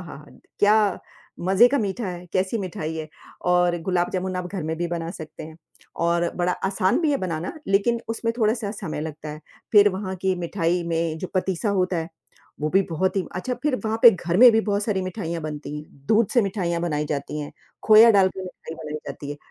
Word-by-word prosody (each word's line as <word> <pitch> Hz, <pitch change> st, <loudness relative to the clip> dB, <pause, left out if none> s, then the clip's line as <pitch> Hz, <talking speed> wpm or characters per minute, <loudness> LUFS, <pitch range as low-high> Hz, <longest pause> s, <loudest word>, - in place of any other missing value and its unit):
हा 150 Hz, -4 st, -10 dB, 0.3 s
क्या 205 Hz, +1 st, +5 dB, 0.7 s
मज़े 195 Hz, +5 st, +6 dB
का 280 Hz, -, +1 dB
मीठा 210 Hz, +1 st, -2 dB
है, 180 Hz, 0 st, -7 dB
कैसी 190 Hz, +4 st, 0 dB
मिठाई 170 Hz, -5 st, -4 dB
है 155 Hz, -1 st, -5 dB, 0.4 s
और 175 Hz, -1 st, +3 dB
गुलाब 180 Hz, -2 st, +1 dB
जामुन 185 Hz, 0 st, -2 dB
आप 180 Hz, 0 st, -3 dB
घर 190 Hz, -5 st, -3 dB
में 160 Hz, +1 st, -3 dB
भी 175 Hz, -, -1 dB
बना 170 Hz, -1 st, -3 dB
सकते 160 Hz, -3 st, -9 dB
हैं 160 Hz, 0 st, -11 dB, 0.5 s
और 170 Hz, 0 st, +2 dB
बड़ा 180 Hz, 0 st, +1 dB, 0.2 s
आसान 190 Hz, -, +1 dB
भी 315 Hz, -3 st, +2 dB
है 285 Hz, -, +2 dB
बनाना 165 Hz, -1 st, -3 dB, 0.2 s
लेकिन 210 Hz, +4 st, +2 dB
उसमें 230 Hz, 0 st, -1 dB
थोड़ा-सा 220 Hz, -1 st, +1 dB
समय 160 Hz, -7 st, -4 dB
लगता 155 Hz, 0 st, -6 dB
है। 150 Hz, 0 st, -7 dB, 0.3 s
फिर 205 Hz, -1 st, +7 dB
वहाँ 190 Hz, -1 st, -4 dB
की 190 Hz, -1 st, +2 dB
मिठाई 175 Hz, 0 st, 0 dB
में 165 Hz, -1 st, -1 dB
जो 185 Hz, -, -4 dB
पतीसा 190 Hz, +2 st, 0 dB
होता 180 Hz, 0 st, 0 dB
है, 165 Hz, 0 st, -3 dB, 0.5 s
वो 155 Hz, +1 st, -1 dB
भी -, -, +3 dB
बहुत 185 Hz, +4 st, 0 dB
ही 190 Hz, -, +1 dB
अच्छा 250 Hz, +8 st, -2 dB
फिर 295 Hz, -4 st, +1 dB
वहाँ 220 Hz, +1 st, -1 dB
पे 235 Hz, -, +11 dB
घर 175 Hz, -3 st, -2 dB
में 250 Hz, -, +11 dB
भी 225 Hz, -, +4 dB
बहुत 200 Hz, 0 st, +1 dB
सारी 200 Hz, -4 st, -1 dB
मिठाइयाँ 170 Hz, -4 st, -4 dB
बनती 150 Hz, -1 st, -5 dB
हैं। 140 Hz, -2 st, -12 dB
दूध 220 Hz, 0 st, +4 dB
से 240 Hz, -, +5 dB
मिठाइयाँ 185 Hz, -4 st, -1 dB
बनाई 150 Hz, -3 st, -1 dB
जाती 145 Hz, +1 st, -4 dB
हैं, 145 Hz, -, -7 dB, 0.3 s
खोया 220 Hz, +1 st, +8 dB
डाल 190 Hz, -1 st, +5 dB
के 190 Hz, -, -8 dB
मिठाइ 170 Hz, -3 st, -9 dB
बनाई 150 Hz, -1 st, -6 dB
जाती 145 Hz, -, -7 dB
है, 145 Hz, -, -5 dB
180 Hz, 210 wpm, -24 LUFS, 160-205 Hz, 0.7 s, पे